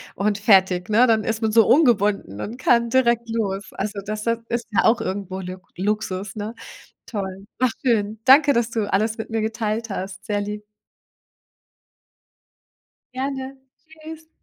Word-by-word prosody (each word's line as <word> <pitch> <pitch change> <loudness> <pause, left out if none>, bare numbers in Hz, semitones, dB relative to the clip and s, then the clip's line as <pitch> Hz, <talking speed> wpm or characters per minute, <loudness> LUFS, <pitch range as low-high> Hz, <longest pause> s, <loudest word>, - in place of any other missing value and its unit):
und 205 0 0
fertig, 190 -3 +3
ne? 230 +4 +5
Dann 220 -2 +3
ist 220 +1 -2
man 220 - +1
so 225 0 +5
ungebunden 210 - +2
und 235 +4 -6
kann 235 -2 +2
direkt 235 -2 +2
los. 200 -4 -2
Also, 205 0 -4
das, 215 +1 -4
ja 230 0 +1
ist 235 0 -2
ja - - +2
auch 230 +1 +4
irgendwo 190 -2 -4
Lu 185 0 -6 0.2
Luxus, 195 0 -2
ne? 215 +2 -5 0.5
Toll. 195 -2 -5
Ach, 255 -2 +2
schön. 215 -3 +1
Danke, 285 +2 +7
dass 235 -2 0
du 215 -3 -2
alles 220 +3 +1
mit 220 - -6
mir 225 -1 -1
geteilt 220 0 -2
hast. 190 0 -6
Sehr 205 -2 -1
lieb. 210 +1 -5 2.5
Gerne. 265 +1 -4 0.3
Tschüss. 320 0 -12
220 Hz, 155 wpm, -22 LUFS, 200-235 Hz, 2.5 s, Danke